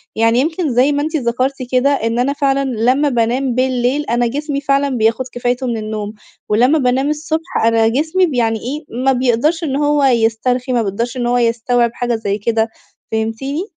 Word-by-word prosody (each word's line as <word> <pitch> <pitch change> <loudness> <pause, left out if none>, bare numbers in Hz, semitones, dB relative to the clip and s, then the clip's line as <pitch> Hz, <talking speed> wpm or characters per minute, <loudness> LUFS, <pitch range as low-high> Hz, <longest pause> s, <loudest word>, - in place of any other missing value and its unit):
يعني 230 +2 +3
يمكن- 320 +3 0
زي 260 +4 +4
ما 285 0 0
أنت 315 +2 -3
ذكرتِ 255 +1 0 0.2
كده- 255 +2 +3 0.2
إن 230 +1 0
أنا 265 +3 +1
فعلًا 275 -1 +1
لما 255 +4 +1
بانام 245 +1 0
بالليل، 255 +2 0
أنا 240 +1 +1
جسمي 285 +3 -3
فعلًا 280 0 +1
بياخد 225 +3 +1
كفايته 245 +1 -2
مِن 235 -2 -1
النوم، 215 -1 -5 0.4
ولما 250 +9 +3
بانام 260 +2 +1
الصبح، 315 +3 -3
أنا 225 -1 +3
جسمي 315 +10 +1
ب 320 - -4
يعني 225 -3 0
إيه 290 +7 -5 0.2
ما 270 - +5
بيقدرش 260 +6 +1
إن 275 -4 -1
هوّ 290 0 +1
يسترخي، 245 +1 +1
ما 240 - +2
بيقدرش 230 +4 -3
إن 240 -1 -1
هو 245 +1 +2
يستوعب 235 0 +1
حاجة 240 -1 -1
زي 205 -3 -2
كده، 225 +1 0 0.4
فهمتيني؟ 225 +8 -2
250 Hz, 185 wpm, -17 LUFS, 230-280 Hz, 0.4 s, ما